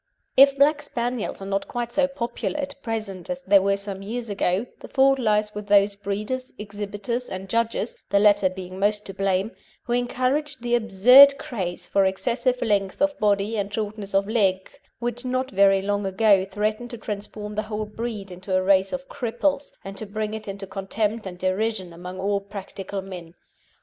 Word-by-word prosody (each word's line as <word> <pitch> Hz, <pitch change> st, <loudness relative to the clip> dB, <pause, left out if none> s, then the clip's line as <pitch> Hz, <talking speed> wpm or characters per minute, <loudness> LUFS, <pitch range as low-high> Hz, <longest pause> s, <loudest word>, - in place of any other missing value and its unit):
If 275 Hz, +1 st, +7 dB
Black 290 Hz, +1 st, +4 dB
Spaniels 240 Hz, -6 st, -3 dB
are -, -, -6 dB
not 195 Hz, 0 st, -2 dB
quite 240 Hz, -1 st, -4 dB
so 275 Hz, +2 st, +2 dB
popular 260 Hz, +1 st, -3 dB
at 280 Hz, -1 st, -5 dB
present 215 Hz, -6 st, -4 dB
as 270 Hz, 0 st, -4 dB
they 200 Hz, 0 st, +6 dB
were 195 Hz, +1 st, +1 dB
some 200 Hz, -1 st, -5 dB
years 230 Hz, +2 st, -4 dB
ago, 195 Hz, +2 st, 0 dB
the -, -, -10 dB
fault 270 Hz, 0 st, +3 dB
lies 210 Hz, -2 st, +1 dB
with 210 Hz, 0 st, -7 dB
those 200 Hz, 0 st, +4 dB
breeders, 210 Hz, +6 st, -4 dB
exhibitors, 210 Hz, +3 st, -4 dB
and 190 Hz, +1 st, -6 dB
judges 230 Hz, -, 0 dB
(the -, -, +3 dB
latter 205 Hz, -2 st, +5 dB
being 185 Hz, 0 st, -8 dB
most 210 Hz, +1 st, +1 dB
to 195 Hz, -, -6 dB
blame) 195 Hz, +2 st, 0 dB, 0.3 s
who 240 Hz, -, -2 dB
encouraged 255 Hz, +3 st, -1 dB
the 240 Hz, 0 st, -1 dB
absurd 250 Hz, +5 st, +7 dB
craze 185 Hz, -10 st, -5 dB
for 195 Hz, -, +3 dB
excessive 240 Hz, +6 st, 0 dB
length 200 Hz, -4 st, 0 dB
of 290 Hz, 0 st, +1 dB
body 205 Hz, +1 st, +1 dB
and 200 Hz, 0 st, -2 dB
shortness 210 Hz, -2 st, -4 dB
of 195 Hz, 0 st, +3 dB
leg 195 Hz, -4 st, +1 dB, 0.3 s
which 240 Hz, +1 st, -4 dB
not 255 Hz, +1 st, -1 dB
very 195 Hz, 0 st, +4 dB
long 205 Hz, 0 st, -1 dB
ago 195 Hz, 0 st, +4 dB
threatened 215 Hz, +4 st, -2 dB
to 235 Hz, -, -5 dB
transform 210 Hz, 0 st, -6 dB
the 210 Hz, -, -1 dB
whole 215 Hz, 0 st, -2 dB
breed 210 Hz, -2 st, -5 dB
into 185 Hz, +1 st, -3 dB
a 185 Hz, -, +2 dB
race 190 Hz, 0 st, +3 dB
of 270 Hz, 0 st, -5 dB
cripples, 275 Hz, +4 st, -1 dB
and 195 Hz, 0 st, -7 dB
to 215 Hz, -, -4 dB
bring 215 Hz, +1 st, -3 dB
it 220 Hz, -1 st, -6 dB
into 195 Hz, 0 st, -5 dB
contempt 205 Hz, +2 st, -2 dB
and 180 Hz, -1 st, -7 dB
derision 185 Hz, 0 st, -1 dB
among 180 Hz, +2 st, -8 dB
all 200 Hz, +1 st, 0 dB
practical 195 Hz, -1 st, -7 dB
men. 180 Hz, -3 st, -9 dB
210 Hz, 185 wpm, -24 LUFS, 195-240 Hz, 0.3 s, If